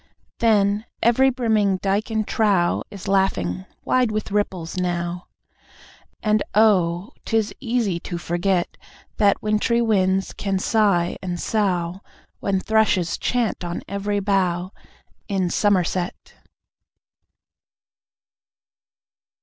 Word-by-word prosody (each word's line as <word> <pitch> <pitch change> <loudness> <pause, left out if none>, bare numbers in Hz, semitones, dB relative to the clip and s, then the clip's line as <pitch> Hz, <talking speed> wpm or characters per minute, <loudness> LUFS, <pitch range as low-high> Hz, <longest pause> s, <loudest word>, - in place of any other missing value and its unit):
Then, 210 -1 +2 0.2
every 250 +3 +4
brimming 220 -6 +1
dyke 200 +4 -1
and 220 -1 -1
trough 200 -6 +2
Is 200 -1 -9
laughing 95 - 0 0.2
wide 255 -2 +2
with 215 -1 -3
ripples 190 -5 -2
now, 175 -1 -2 1.0
And 215 -1 +2
oh, 195 -1 +3
'tis 225 -2 0
easy 230 -8 -1
to 175 0 -5
forget 175 +1 -1 0.4
That 205 -2 +3
wintry 215 +3 +1
winds 195 -4 +1
can 195 -1 -2
sigh 190 -4 +2
and 175 -2 -4
sough, 185 -4 -1 0.4
When 195 -1 0
thrushes 205 -5 +2
chant 235 -6 -1
on 175 0 -4
every 200 +1 -2
bough 185 -2 0 0.6
In 190 -4 0
Somerset! 185 -3 0
195 Hz, 100 wpm, -22 LUFS, 180-215 Hz, 1.0 s, every